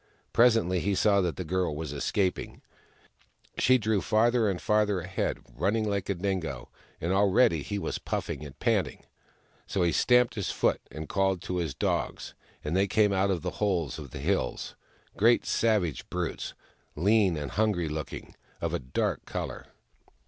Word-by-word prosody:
Presently, 115 -7 +4
he 100 +4 0
saw 100 0 +4
that 90 -3 -1
the 90 - -4
girl 90 -2 -1
was 75 -1 -5
escaping; 90 +6 -1 1.0
she 130 0 +5
drew 110 -3 0
farther 115 0 +3
and 95 -2 -2
farther 105 -2 +2
ahead, 90 +2 -2 0.2
running 105 - +1
like 100 -2 -2
a 100 - +1
dingo, 85 -9 -3 0.3
and 85 +3 -1
already 95 -4 +4
he 100 +8 -4
was - - -3
puffing - - -3
and 70 -2 -10
panting. - - 0 0.6
So 95 - 0
he 85 - +3
stamped 125 +4 +4
his 100 -4 -3
foot - - +1
and 80 0 -7
called 95 +1 +1
to 90 - -3
his 80 -6 -2
dogs, - - -2 0.3
and 75 +4 -2
they 100 +1 +3
came 105 +1 +3
out 95 +1 +2
of 90 -4 -1
the 90 - -2
holes 90 -9 0
of 70 -3 -8
the - - -8
hills 75 -6 -1 0.2
— - - -31
great 115 +3 +4
savage 105 - 0
brutes, 90 -2 -3 0.4
lean 95 0 +3
and 75 -2 -4
hungry 105 -5 +1
looking, 75 0 -6 0.3
of - - -2
a - - 0
dark 65 +1 -2
colour. - - -5
95 Hz, 170 wpm, -28 LUFS, 85-105 Hz, 1.0 s, she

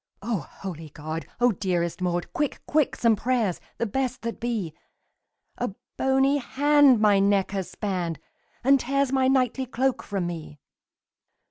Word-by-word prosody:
"O 225 -3 -1
holy 160 +2 -8
God! 155 +3 -6
O 245 0 +5
dearest 175 -3 -1
Maud, 175 -1 -1
Quick, 300 -5 -1
quick, 300 -2 +1
some 230 -2 +3
prayers, 230 -4 0 0.2
the 235 - 0
best 255 +3 -2
that 230 0 -4
be! 220 -9 -2 0.9
A 240 -5 -2 0.2
bony 270 +1 +3
hand 285 -1 +4
my 210 -2 +5
neck 195 -1 +2
has 195 -3 -3
spanned, 180 -6 -3 0.5
And 275 +2 +5
tears 275 +1 0
my 265 -1 +3
knightly 260 0 +1
cloak 260 +1 0
from 195 -4 -3
me!" 160 -4 -6
230 Hz, 145 wpm, -26 LUFS, 185-265 Hz, 0.9 s, O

